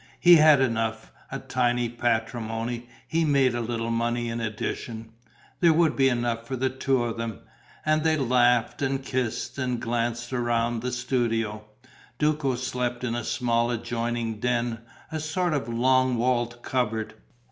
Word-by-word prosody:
He 175 -1 +8
had 155 -3 +6
enough: 115 -3 -1 0.2
a - - -2
tiny 120 -1 0
patrimony; 115 0 -2 0.2
he 165 0 +1
made 140 -4 +3
a 120 - -1
little 115 0 -2
money 120 +1 0
in 115 0 -3
addition: 110 +1 -4 0.5
there 170 -2 +5
would 160 0 +3
be 135 -1 +4
enough 120 -2 -1
for 130 - -3
the 130 +1 0
two 130 -1 +1
of 115 -1 -3
them. 115 -3 -4 0.4
And 155 0 +2
they 160 -1 +3
laughed 125 -2 +2
and 135 -1 -1
kissed 125 0 -2
and 125 -2 -1
glanced 120 +1 -2
round 120 -2 0
the 125 +1 -2
studio. 115 -4 -1 0.5
Duco 150 -3 +1
slept 125 0 -3
in 120 -2 -1
a 120 0 -2
small 120 0 +1
adjoining 115 -1 -2
den, 120 -1 0 0.3
a 160 - -2
sort 155 +3 -1
of 135 -5 -2
long 130 +1 +3
wall 120 0 +2
cupboard. 120 -2 -2
120 Hz, 155 wpm, -26 LUFS, 115-130 Hz, 0.5 s, He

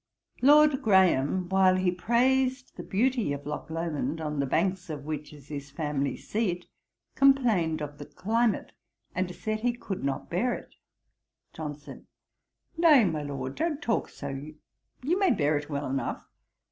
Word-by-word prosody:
Lord 295 +1 +6
Graham, 185 -4 +3
while 190 -1 +4
he 185 -1 +2
praised 255 +6 +1
the - - -6
beauty 235 - 0
of 140 0 -7
Lochlomond, 160 -1 -3
on 150 -2 -3
the 140 - +1
banks 180 +4 0
of 145 -2 -6
which 150 -1 -5
is 145 -2 -15
his 140 -2 -6
family 145 -1 -2
seat, 185 -5 -2 0.5
complained 220 - +3
of 145 0 -7
the 145 - -8
climate, 225 +2 0 0.4
and 185 -1 -1
said 215 0 -3
he 240 +2 +1
could 205 -5 -6
not 140 -1 -2
bear 220 +9 0
it. - - -11 0.8
JOHNSON. 150 -2 -8 0.7
'Nay, 300 -9 +7
my 160 -4 -1
Lord, 135 -2 -4
don't 320 -3 -1
talk 230 -7 -1
so: 140 - -7 0.7
you 345 +8 +1
may 390 -2 +4
bear 155 - +2
it 145 +1 -3
well 145 -1 -2
enough. 135 -2 -3
180 Hz, 150 wpm, -28 LUFS, 145-235 Hz, 0.8 s, Nay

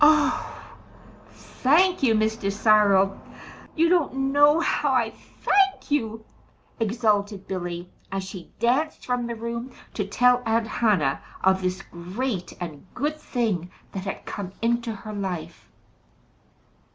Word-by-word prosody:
"Oh, 310 0 +3 0.6
thank 355 +8 +2
you, 235 -5 +4
Mr. 215 -2 0
Cyril 200 -2 +4 0.6
you 330 +1 +4
don't 270 -6 +1
know 290 +2 +6
how 295 -3 +1
I 240 -4 +2
thank 390 - 0
you!" 225 -6 -1 0.5
exulted 210 -3 0
Billy, 175 -1 -4 0.2
as 195 0 -2
she 190 -2 -9
danced 260 +7 0
from 245 -1 -1
the 235 - -4
room 235 +2 -5 0.2
to 205 - -1
tell 250 +4 +4
Aunt 225 0 +1
Hannah 205 - +1 0.2
of 190 0 +4
this 185 +1 -2
great 185 +4 -4
and 170 -1 -7
good 300 +3 -1
thing 215 - -1 0.2
that 190 0 -5
had 195 - -5
come 190 -3 -6
into 235 0 0
her 215 0 -7
life. 190 -5 -5
225 Hz, 125 wpm, -25 LUFS, 195-255 Hz, 0.6 s, know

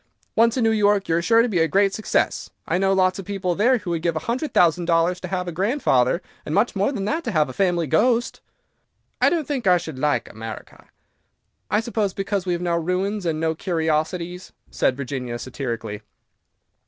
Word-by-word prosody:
Once 230 +2 +3
in 250 - +1
New 225 - +3
York, 205 -2 +2
you 165 - +1
are 170 - +1
sure 230 +5 +4
to - - +1
be 195 -7 0
a 165 - +3
great 195 +4 +2
success. 215 - -1 0.2
I 180 - +1
know 195 0 +2
lots 185 0 +2
of 195 - -7
people 195 -2 -2
there 240 +8 +3
who 185 -5 -5
would 165 -1 -1
give 170 -1 0
a 155 - -4
hundred 255 +5 -2
thousand 175 -2 +3
dollars 170 +1 +2
to 180 - -6
have 180 0 -3
a - - -2
grandfather, 175 - +1 0.2
and 150 - -3
much 210 +4 +2
more 200 +7 +1
than 205 -8 -3
that 320 +9 -1
to 235 - -1
have 155 -6 +2
a - - -7
family 175 -2 +1
ghost." 235 - +1 0.8
"I - - +6
don't 325 -5 -1
think 265 -8 -2
I 180 -1 +6
should 160 -5 -7
like 150 +1 0
America." 110 +1 -9 0.8
"I 210 +2 +2
suppose 215 -4 -2
because 195 -1 -2
we 180 - +1
have 175 0 -3
no 170 -1 +1
ruins 185 +3 -1
and 155 -1 -1
no 160 0 0
curiosities," 170 +2 -2 0.2
said 130 - +1
Virginia, 125 -3 -4
satirically. 120 -4 -5
180 Hz, 210 wpm, -23 LUFS, 160-205 Hz, 0.8 s, I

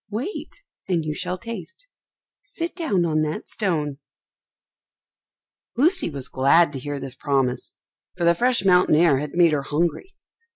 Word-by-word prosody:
Wait, 265 - -6 0.2
and 170 -4 0
you 155 - -2
shall 180 +4 -3
taste. 235 - -9 0.5
Sit 335 0 -6
down 245 - 0
on 155 -2 +1
that 155 0 -3
stone." 150 -9 -2 1.8
Lucy 335 - +3
was 140 -4 -6
glad 145 +4 +3
to 135 - -5
hear 145 +2 -5
this 135 -1 -7
promise, 135 -2 -1 0.4
for 175 - -2
the 170 0 +5
fresh 245 +2 +1
mountain 180 -4 +5
air 155 -4 +4
had 150 +1 -6
made 175 -2 +5
her 145 - +1
hungry. 165 - -2
170 Hz, 150 wpm, -23 LUFS, 145-215 Hz, 1.8 s, the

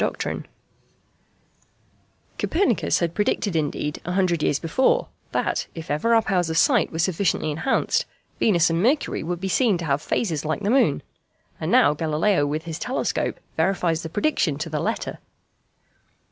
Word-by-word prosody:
] - - +3 2.4
Copernicus 320 - +1
had 170 -1 -1
predicted, 205 -1 0
indeed, 150 -1 -2
a 180 - -3
hundred 180 -4 +1
years 145 - +2
before, 165 - +1 0.2
that, - - -1
if 160 -3 -6
ever 230 +11 +2
our 225 - +4
powers 180 -5 0
of 160 - -1
sight - - +3
were 160 - -5
sufficiently 170 -2 0
enhanced, 170 - 0 0.3
Venus 170 -6 +3
and 165 +1 +1
Mercury 265 +8 +1
would 175 +2 -3
be 190 - -3
seen 210 0 +2
to 170 - -5
have 140 -1 0
phases 160 -2 -1
like 155 +5 -2
the 205 - +1
moon. 245 - +3 0.6
And - - -2
now 145 - +5
Galileo 155 +1 +1
with 155 +2 -2
his 165 -1 -6
telescope 255 - -2 0.2
verifies 170 -1 +1
the 160 - -6
prediction 185 - 0
to 160 +1 -5
the 150 - -1
letter. - - -3
170 Hz, 160 wpm, -23 LUFS, 155-200 Hz, 2.4 s, now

